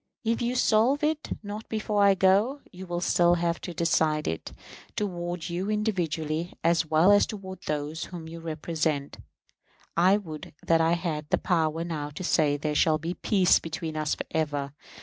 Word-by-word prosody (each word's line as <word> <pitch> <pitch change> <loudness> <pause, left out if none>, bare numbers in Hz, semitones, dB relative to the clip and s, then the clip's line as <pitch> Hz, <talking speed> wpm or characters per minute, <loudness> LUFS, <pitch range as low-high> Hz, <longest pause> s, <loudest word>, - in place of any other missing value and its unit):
If 230 0 0
you 240 +1 0
solve 250 +4 +3
it 310 0 0
not 210 +2 -7
before 215 -1 0
I 200 -1 +6
go, 200 +9 +3
you 185 0 -9
will 175 0 -3
have - - -1
still 175 0 +4
to 170 +1 -2
decide 155 -2 +1
it. 80 - -4 0.4
Toward 175 -4 -3
you 180 +3 -3
individually, 175 -6 -1
as 165 -1 +2
well 160 +5 +5
as 205 - +5
to 190 -3 -7
those 150 +1 -2
whom 170 -3 -8
you 165 +1 -8
represent, 160 -2 -2 0.8
I 185 +4 +5
would 155 -8 -8
that 165 0 +4
I 165 +1 +3
had 160 -4 -3
the - - +3
power 165 -2 0
now 155 -4 -4
to 185 - -5
say 150 -4 +2
there 150 +1 -2
shall 155 +1 +3
be 165 +3 -4
peace 185 -1 +3
between 160 -1 -5
us 155 -1 0
for - - -5
ever. 145 -3 -1
170 Hz, 175 wpm, -27 LUFS, 155-195 Hz, 0.8 s, I